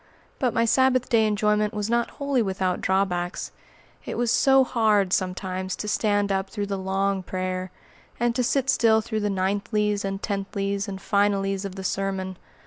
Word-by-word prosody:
But 250 -3 0
my 230 - +3
Sabbath 255 +1 +3
day 220 -2 +4
enjoyment 210 0 +1
was 210 -1 -2
not 235 0 +1
wholly 280 -3 +1
without 190 -3 -1
drawbacks. 185 -2 -1 0.5
It - - -5
was 240 -1 +1
so 270 -1 +5
hard, 215 -7 +2
sometimes, 185 0 -2
to 210 - -5
stand 205 -1 +1
up 195 0 -1
through 205 -2 -3
the 200 0 -3
"long 195 +1 0
prayer," 185 0 -3 0.5
and 240 0 +2
to 250 - +1
sit 270 +2 +1
still 220 -1 +4
through 220 0 -3
the 205 -1 -1
"ninthlies," 205 +2 0
and 195 0 -3
"tenthlies," 200 0 -2
and 195 -1 -5
"finallys" 195 -1 +1
of 190 -1 -6
the 190 - -6
sermon! 190 -1 -2
200 Hz, 170 wpm, -25 LUFS, 190-220 Hz, 0.5 s, so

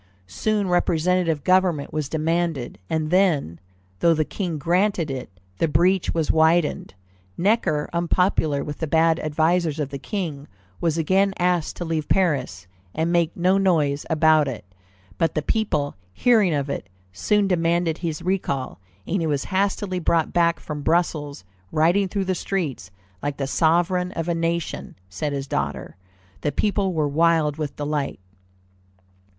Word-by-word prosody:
Soon 205 - -1
representative 175 -2 +1
government 185 -5 +2
was 155 -3 -2
demanded, 160 -4 -1
and 155 -1 -1
then, 165 - +2 0.4
though 170 -1 +4
the 155 0 +1
King 175 -3 -3
granted 175 +1 +1
it, 130 -1 -5 0.3
the 165 - +2
breach 175 +5 +2
was 165 -2 +1
widened. 160 - +2 0.4
Necker, 175 -7 +1
unpopular 170 -4 +1
with 150 -1 -6
the 160 - -2
bad 160 +1 +3
advisers 160 +1 +1
of 145 -3 -2
the 140 0 -6
King, 155 -5 -4 0.3
was 165 -1 0
again 195 +4 +2
asked 180 -2 0
to 175 - -5
leave 160 -2 -2
Paris, 135 - 0 0.3
and 160 +2 0
make 170 -1 +1
no 185 +2 +3
noise 150 -7 +1
about 155 -1 +4
it; 120 -8 -6 0.5
but 165 - +1
the 155 - 0
people, 150 -10 0 0.2
hearing 220 -7 +4
of 140 -1 -1
it, 140 - -5 0.2
soon 205 - +1
demanded 170 -2 +1
his 165 -4 -4
recall, 175 - -2 0.3
and 185 +1 -1
he 165 - 0
was 145 -3 0
hastily 190 -1 -1
brought 165 -2 +1
back 170 -1 +2
from 150 -1 -6
Brussels, 150 - -1 0.3
riding 175 +6 +3
through 195 +1 -2
the 185 - 0
streets 165 - -3 0.3
like 145 -1 -3
"the 135 - -2
sovereign 175 +5 +1
of 165 0 -3
a 170 - +1
nation," 165 0 -2 0.2
said 145 +10 -3
his 140 -1 -3
daughter. 70 - -3 0.5
The 145 - 0
people 200 0 0
were 155 -4 0
wild 160 0 +2
with 150 -3 -4
delight. 145 -1 -2
165 Hz, 150 wpm, -23 LUFS, 150-180 Hz, 0.5 s, though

